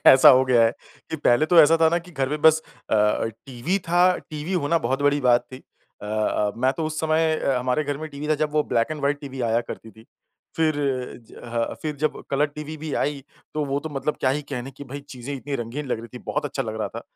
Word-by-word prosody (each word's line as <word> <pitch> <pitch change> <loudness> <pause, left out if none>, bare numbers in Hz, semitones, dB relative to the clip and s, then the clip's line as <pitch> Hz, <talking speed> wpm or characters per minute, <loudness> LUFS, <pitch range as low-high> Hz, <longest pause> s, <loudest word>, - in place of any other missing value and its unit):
ऐसा 135 +3 +9
हो 130 -1 +7
गया 125 -3 +4
है 115 - +4 0.4
कि 160 - -2
पहले 145 +1 +3
तो 170 0 +7
ऐसा 160 +2 +6
था 160 - +6
ना 170 +1 +2
कि 175 +1 -14
घर 135 -3 -1
में 150 +1 -3
बस 160 0 +6 0.3
अ, - - +3 0.5
टीवी 135 +10 -1
था। 175 +1 +4 0.2
टीवी 155 +4 -6
होना 170 -1 +1
बहुत 135 0 -1
बड़ी 145 0 +3
बात 120 -1 +4
थी। - - -6 0.5
अ, - - -6
अ, 105 -1 0
मैं 130 +2 +2
तो 160 - -2
उस 155 0 -3
समय 160 0 +2
अ, 135 -4 0
हमारे 125 +4 0
घर 145 0 -3
में 155 0 -6
टीवी 145 +1 -7
था 155 - +4
जब 150 - 0
वो 150 -1 +3
ब्लैक 115 +3 +2
एंड 155 -1 -4
व्हाइट 140 +1 0
टीवी 135 -2 -7
आया 115 +1 +3
करती 110 - -8
थी। 110 +2 -18 0.5
फिर 160 -2 +2 0.6
ज - - -14
ह 115 -1 -2
फिर 155 -1 -2
जब 155 - -1
कलर 140 +2 +2
टीवी 150 +1 -8
भी 155 -1 -6
आई 145 -1 -1 0.3
तो 155 -1 0
वो 140 0 -1
तो 160 - -5
मतलब 145 +1 -2
क्या 130 - +3
ही 150 +2 -1
कहने 135 0 -4
कि 140 +2 -11
भई 140 +2 -7
चीज़ें 130 +1 -6
इतनी 140 +1 -5
रंगीन 120 +6 -5
लग 125 - -1
रही 115 - -10
थी। - - -6
बहुत - - -1
अच्छा - - -2
लग - - -5
रहा - - -1
था। - - -8
145 Hz, 255 wpm, -24 LUFS, 130-155 Hz, 0.6 s, ऐसा